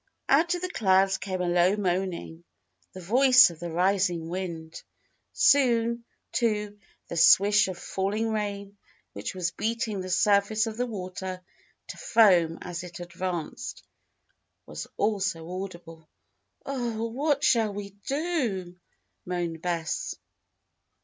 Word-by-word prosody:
Out 335 +6 +3
of 355 - -6
the 365 - -2
clouds 190 - +2
came 185 -2 -3
a 180 - -1
low 175 +2 +3
moaning 180 -4 -2 0.5
the 185 - -10
voice 255 +4 +6
of 165 - -13
the 175 - -5
rising 180 -1 +1
wind. 170 -3 -5 0.5
Soon, 235 -4 +3 0.3
too, 210 -3 -1 0.3
the - - -6
swish 205 +5 +6
of 185 -2 -5
falling 205 +4 -2
rain, 200 -2 -4 0.3
which - - -5
was 175 -2 -1
beating 225 0 -2
the 185 - -6
surface 205 +3 +3
of 220 -1 -5
the 245 +2 -1
water 185 -3 -6 0.5
to - - -7
foam 185 - +4
as 175 0 -5
it 175 -1 -9
advanced, 175 -2 -5 0.8
was 75 0 -7
also 195 -6 -1 0.2
audible. 165 -4 -11 0.6
"Oh! 235 -4 -2
what 285 +4 0
shall 225 -7 +3
we 200 0 -7
do?" 265 - -2 0.5
moaned 175 -3 -3
Bess. 170 -2 -2
195 Hz, 125 wpm, -27 LUFS, 175-225 Hz, 0.8 s, voice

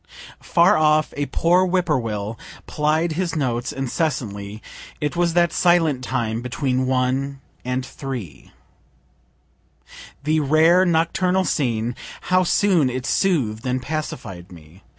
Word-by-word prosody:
Far 170 0 +4
off 155 0 +2
a 145 0 -2
poor 175 +2 +3
whip 185 -1 +1
poor 150 -6 +1
will 110 -1 -4 0.3
plied 155 +3 0
his 170 +1 -2
notes 125 -5 -1
incessantly. 115 - -3 0.4
It 150 +2 -2
was 170 -1 +1
that 170 -2 +3
silent 165 -7 +2
time 115 -3 -2
between 130 +1 -1
1 130 +2 0 0.2
and 125 +1 -2
3. 130 - -7 1.7
The 155 +1 +2
rare 160 +5 +4
nocturnal 180 +3 +1
scene, 120 -6 -1 0.4
how 185 0 +5
soon 180 -6 +2
it 125 0 -4
sooth'd 135 - 0
and 125 +1 0
pacified 120 - -6
me! 85 +2 -15
140 Hz, 125 wpm, -22 LUFS, 120-165 Hz, 1.7 s, how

